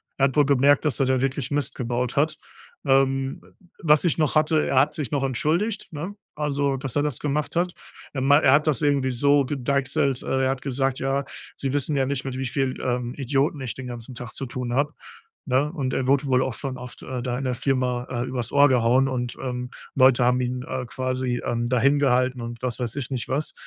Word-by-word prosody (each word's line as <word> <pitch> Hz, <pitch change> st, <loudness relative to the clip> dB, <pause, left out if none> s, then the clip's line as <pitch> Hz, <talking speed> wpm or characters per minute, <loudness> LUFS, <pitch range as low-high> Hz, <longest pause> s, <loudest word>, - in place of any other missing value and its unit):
Er 135 Hz, -, +3 dB
hat 135 Hz, +1 st, -1 dB
wohl 145 Hz, -, +6 dB
gemerkt, 140 Hz, +1 st, +4 dB
dass 140 Hz, -6 st, +1 dB
er 135 Hz, -, +3 dB
da 130 Hz, 0 st, +2 dB
wirklich 135 Hz, -1 st, -2 dB
Mist 145 Hz, -1 st, -1 dB
gebaut 125 Hz, 0 st, -2 dB
hat. 155 Hz, +2 st, +1 dB, 0.5 s
Ähm, 135 Hz, 0 st, +2 dB
w -, -, -20 dB, 0.3 s
was 150 Hz, +1 st, +4 dB
ich 170 Hz, -, +2 dB
noch 155 Hz, -1 st, +1 dB
hatte, 155 Hz, 0 st, +3 dB
er 130 Hz, -, +3 dB
hat 145 Hz, +3 st, +3 dB
sich 145 Hz, -6 st, -4 dB
noch 140 Hz, -2 st, 0 dB
entschuldigt, 160 Hz, -, -1 dB
ne? 170 Hz, +6 st, -5 dB, 0.2 s
Also, 140 Hz, -2 st, 0 dB
dass 135 Hz, -1 st, -6 dB
er 145 Hz, -, +3 dB
das 150 Hz, -5 st, -2 dB
gemacht 150 Hz, +2 st, -2 dB
hat. 175 Hz, +1 st, +1 dB, 0.4 s
Er 135 Hz, -, -2 dB
mei 140 Hz, +2 st, +6 dB
er 130 Hz, -, +5 dB
hat 150 Hz, +2 st, +4 dB
das 150 Hz, -6 st, +1 dB
irgendwie 140 Hz, -3 st, +2 dB
so 140 Hz, +3 st, +3 dB
gedeichselt, 140 Hz, 0 st, 0 dB
äh, 130 Hz, 0 st, 0 dB
er 130 Hz, -, +2 dB
hat 135 Hz, -1 st, -4 dB
gesagt: 135 Hz, -1 st, -1 dB
„Ja, 135 Hz, +1 st, 0 dB, 0.3 s
Sie 135 Hz, 0 st, -2 dB
wissen 145 Hz, 0 st, 0 dB
ja 135 Hz, -, +2 dB
nicht, 135 Hz, -1 st, -2 dB
mit 130 Hz, -1 st, -4 dB
wie 130 Hz, -, -2 dB
viel, 135 Hz, 0 st, -1 dB
ähm, 125 Hz, -1 st, -2 dB
Idioten 140 Hz, +2 st, 0 dB
ich 130 Hz, -3 st, -4 dB
den 130 Hz, -1 st, -8 dB
ganzen 120 Hz, +1 st, -7 dB
Tag 120 Hz, -1 st, -7 dB
zu 135 Hz, -, -5 dB
tun 120 Hz, -1 st, -4 dB
habe“, 145 Hz, +3 st, +1 dB, 0.5 s
ne? 140 Hz, +4 st, +1 dB
Und 135 Hz, -5 st, -2 dB
er 130 Hz, -, 0 dB
wurde 140 Hz, +1 st, +3 dB
wohl 130 Hz, -1 st, +3 dB
auch 130 Hz, -, -2 dB
schon 130 Hz, +2 st, -5 dB
oft, 125 Hz, -1 st, -10 dB
äh, 130 Hz, -1 st, -5 dB
da 125 Hz, -1 st, -2 dB
in 135 Hz, -, -4 dB
der 125 Hz, -, 0 dB
Firma, 125 Hz, -1 st, 0 dB
äh, 120 Hz, -1 st, -2 dB
übers 125 Hz, -3 st, -4 dB
Ohr 140 Hz, 0 st, +6 dB
gehauen 125 Hz, +1 st, +3 dB
und, 125 Hz, -2 st, -3 dB
ähm, 125 Hz, -1 st, -4 dB, 0.3 s
Leute 130 Hz, -2 st, +5 dB
haben 125 Hz, +1 st, +3 dB
ihn, 125 Hz, 0 st, -2 dB
äh, 130 Hz, -1 st, -4 dB
quasi, 130 Hz, 0 st, -2 dB
ähm, 120 Hz, -1 st, -1 dB
da 125 Hz, -1 st, +2 dB
hin 140 Hz, +3 st, +4 dB
gehalten 130 Hz, -2 st, +2 dB
und 115 Hz, 0 st, -7 dB
was 125 Hz, -1 st, -3 dB
weiß 120 Hz, -1 st, -3 dB
ich 135 Hz, -2 st, -3 dB
nicht 125 Hz, -4 st, -3 dB
was. 140 Hz, +4 st, -1 dB
135 Hz, 235 wpm, -24 LUFS, 125-140 Hz, 0.5 s, wohl